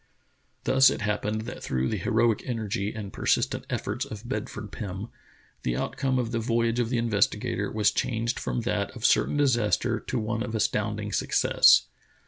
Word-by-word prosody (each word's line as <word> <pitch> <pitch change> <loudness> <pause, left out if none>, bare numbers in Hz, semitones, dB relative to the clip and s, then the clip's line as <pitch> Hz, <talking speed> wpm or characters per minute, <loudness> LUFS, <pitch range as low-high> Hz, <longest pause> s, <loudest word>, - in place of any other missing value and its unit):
Thus 135 0 +6
it - - -3
happened 105 +1 -1
that 115 +2 -7
through 65 0 -1
the 110 - -1
heroic 115 +2 +2
energy 105 -4 -2
and 105 -3 -7
persistent - - 0
efforts 110 +5 -2
of 110 +2 -8
Bedford 110 -3 -5
Pim, 100 +2 -6 0.5
the - - -1
outcome 130 -1 -1
of 120 -2 -1
the 115 - 0
voyage 115 +1 +1
of 120 -2 0
the 125 - 0
Investigator* 115 -4 0
was 105 -1 +2
changed 115 0 -1
from 120 - -2
that 105 -4 -1
of 120 - -4
certain 145 - +3
disaster 120 -4 +2
to 130 - -4
one 110 0 -2
of 115 -2 -3
astounding 110 - -1
success. - - +5
115 Hz, 165 wpm, -27 LUFS, 105-120 Hz, 0.5 s, Thus